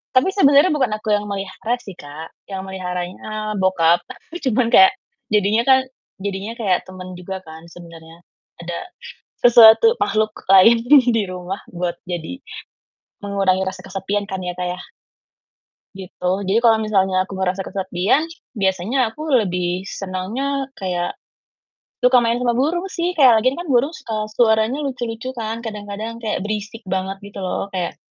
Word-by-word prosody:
Tapi 255 - +5
sebenarnya 285 -2 +5
bukan 260 -6 +1
aku 215 0 -5
yang 205 - -2
melihara 200 +3 -3
sih 195 -6 -11
Kak, 150 +2 -10 0.2
yang 190 0 -5
meliharanya, 190 +3 -5
bokap. 175 -3 +2 0.2
Aku 345 +2 -9
cuman 235 +1 +2
kayak, 380 +11 +7 0.4
jadinya 210 +2 +3
kan, 265 +1 +5 0.4
jadinya 200 +2 -4
kayak 190 -5 +1
temen 185 0 -10
juga 190 +2 -6
kan 160 +1 -11
sebenarnya, 165 -1 -13 0.4
ada 170 0 -5 0.6
sesuatu 240 - +7
makhluk 215 0 0 0.2
lain 225 +5 +7
di 285 +3 +8 0.2
di 220 - +2
rumah 185 +1 -6
buat 175 -1 -3
jadi 175 +8 -5 0.8
mengurangi 195 -2 +1
rasa 190 - -5
kesepian 195 +2 -3
kan 190 -2 -4
ya 180 0 -3
Kak 180 - -1
ya. 180 0 -4 1.2
Gitu, 180 -1 -3 0.2
jadi 200 +4 +3
kalau 225 -2 +6
misalnya 195 -3 +1
aku - - -9
merasa 190 0 -1
kesepian, 190 - 0 0.3
biasanya 190 +4 0
aku 305 - -11 0.2
lebih 180 -1 -2
senangnya 225 +10 -4
kayak 180 -2 -3 0.8
suka 250 0 +5
main 235 +1 +1
sama 245 -1 0
burung 320 +9 0
sih, 345 0 0
kayak 240 -6 +6
lagi 255 - +4
kan 350 - -6
burung 250 +5 +3
suka 225 - -6 0.2
suaranya 220 +2 +3
lucu-lucu 245 -2 -4
kan, 225 -2 -4
kadang-kadang 210 +1 -6
kayak 220 - -1
berisik 215 +2 -5
banget 190 +1 -2
gitu 200 - -11
loh, 185 +1 -2
kayak 180 -2 -3
200 Hz, 150 wpm, -20 LUFS, 185-235 Hz, 1.2 s, di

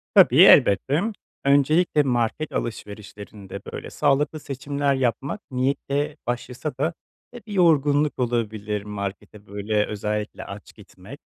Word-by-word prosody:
Tabii, - - +7
elbette. 135 - +5 0.4
Öncelikle 150 +3 +3
market 125 +4 -1
alışverişlerinde 105 -2 -7
böyle - - -7
sağlıklı 150 +3 +1
seçimler 140 0 -2
yapmak 130 - -2
niyetle 140 +3 -1
başlasa 125 +4 -4
da, 160 +4 0 0.4
eee, 240 - -9
bir 210 - -7
yorgunluk 150 -5 +3
olabilir, 110 -4 -2
markete 105 0 -7
böyle, 105 +1 -1
özellikle 105 0 -4
aç - - -10
gitmek, 105 +11 -13
125 Hz, 110 wpm, -23 LUFS, 105-145 Hz, 0.4 s, Tabii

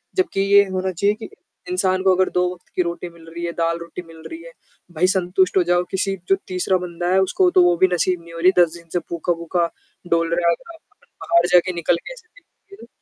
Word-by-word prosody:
जबकि 370 - 0
ये 200 +1 +6
होना 185 0 -2
चाहिए 200 +4 +1
कि, 220 - -9 0.4
इंसान 185 - 0
को 190 -1 +5
अगर 185 0 +2
दो 180 - +3
वक़्त 180 - -14
की - - +2
रोटी 170 0 -3
मिल 170 -1 -18
रही 170 +1 -7
है, 170 - -2
दाल-रोटी 170 +1 -3
मिल 165 -1 -14
रही 330 0 -9
है, - - -11 0.4
भई 175 +3 +1
संतुष्ट 185 +1 +1
हो 180 - +5
जाओ, 175 0 +3
किसी 195 0 -1
जो 195 - +5
तीसरा 185 0 0
बंदा 175 0 -5
है, 190 - +4
उसको 360 - +2
तो 180 - +8
वो 175 0 +4
भी 185 - +5
नसीब 180 0 0
नहीं 170 0 -14
हो 165 - -7
रही, 180 +2 +5
10 170 -2 +4
दिन 170 0 -17
से 175 - +1
भूखा, 170 +1 -2
भूखा 170 0 -1 0.4
डोल 165 0 +2
रहा 175 0 +1
है - - +4
अगर 340 - -13
अपन 450 +7 -33 0.2
बाहर 170 +1 +3
जाके 180 +1 +4
निकल 170 0 +1
के - - -7
ऐसे 465 -3 -17
देखें 425 -4 -18
180 Hz, 240 wpm, -21 LUFS, 170-195 Hz, 0.4 s, तो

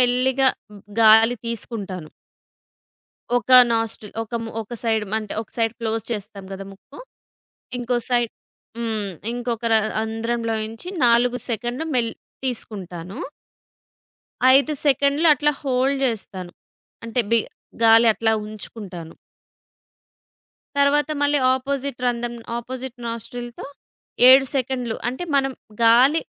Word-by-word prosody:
మెల్లిగా 255 +2 +3 0.5
గాలి 225 +2 +6
తీసుకుంటాను. 200 -7 -4 1.3
ఒక 245 - -2 0.2
నాస్ట్రిల్ 225 -2 -3
ఒక 225 - -12
ము 225 - -6
ఒక 220 +3 -9
సైడ్ 220 -2 +1
మ్ - - -2
అంటే 215 -2 -6
ఒక 220 - -20
సైడ్ 225 -1 +1
క్లోజ్ 225 -1 -1
చేస్తాం 205 -2 -5
కదా 195 0 -6
ముక్కు, 200 +8 -16 0.8
ఇంకో 245 0 -1
సైడ్ 240 -2 +1 0.5
హ్మ్. 220 -4 -2 0.2
ఇంకొక 240 -1 -3
ర - - +6 0.3
అంధ్రంలో 225 +1 -2
నుంచి 225 +9 -8 0.2
నాలుగు 240 +1 +4
సెకన్‌లు 240 +5 -3
మెళ్ 235 -2 +1 0.3
తీసుకుంటాను. 195 -6 -5 1.4
5 280 +3 +2
సెకండ్‌లు 285 +3 +3
అట్లా 295 +2 +1
హోల్డ్ 270 0 +1
చేస్తాను. 190 -6 -4 0.5
అంటే 230 +2 0
బి 230 - +6 0.5
గాలి 225 +1 +7
అట్లా 225 0 +1
ఉంచుకుంటాను. 200 -6 -9 1.6
తరువాత 290 +2 +3
మళ్ళీ 290 0 +3 0.2
అపోజిట్ 275 0 -3
రంధ్రం 240 0 -1 0.2
అపోజిట్ 255 +1 -7
నాస్ట్రిల్‌తో 235 +1 -6 0.6
7 265 +1 +8
సెకండ్‌లు 255 -3 -1
అంటే 260 +8 -4
మనం 270 -1 +1 0.3
గాలి 255 +8 +5
235 Hz, 110 wpm, -22 LUFS, 220-255 Hz, 1.6 s, 7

